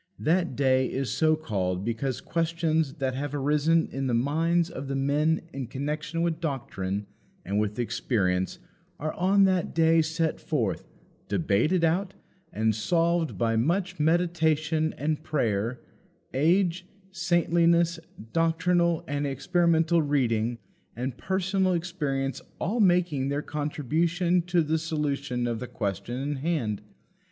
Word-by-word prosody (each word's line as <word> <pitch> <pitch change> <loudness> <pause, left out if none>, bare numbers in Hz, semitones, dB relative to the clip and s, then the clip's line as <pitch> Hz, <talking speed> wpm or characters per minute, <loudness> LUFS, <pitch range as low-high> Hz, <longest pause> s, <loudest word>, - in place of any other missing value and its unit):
That 170 -3 +1
day 130 -1 +3
is 135 -1 -2
so 155 -1 +3
called 95 -10 -2
because 120 +3 -2
questions 160 -3 0
that 135 -4 -1
have 145 +2 -3
arisen 150 +3 +2
in 135 0 -2
the 120 - +1
minds 165 +7 +1
of 135 +1 -6
"the 135 - -2
men" 150 +4 +1
in 135 -3 -4
connection 150 +6 -3
with 165 -2 0
doctrine 105 - -3 0.4
and 100 +3 0
with 105 0 -1
experience 95 -6 0 0.4
are 155 +1 -2
on 195 +2 +3
that 185 -2 +1
day 165 0 +5
set 160 0 -1
forth, 130 - -1 0.4
debated 155 - +1
out, 185 +4 +1 0.4
and 110 -6 +1
solved 170 - +1
by 115 -1 +1
much 180 - 0
meditation 160 -1 +2
and 150 +1 -1
prayer; 120 -6 -1 0.5
age, 175 +5 +2 0.2
saintliness, 170 -1 +2 0.3
doctrinal 170 +1 +2
and 145 0 -1
experimental 165 +3 +2
reading, 120 -6 +1 0.4
and 125 +2 -3
personal 190 +2 0
experience 145 -7 -2 0.2
all 220 +7 -1
making 175 -8 +3
their 145 +1 -1
contribution 160 +5 0
to 175 0 +1
the 160 +1 0
solution 145 -6 -2
of 120 -2 -2
the 125 - -5
question 100 +4 -3
in 145 +2 -2
hand. 130 -9 -1
155 Hz, 130 wpm, -27 LUFS, 130-170 Hz, 0.5 s, day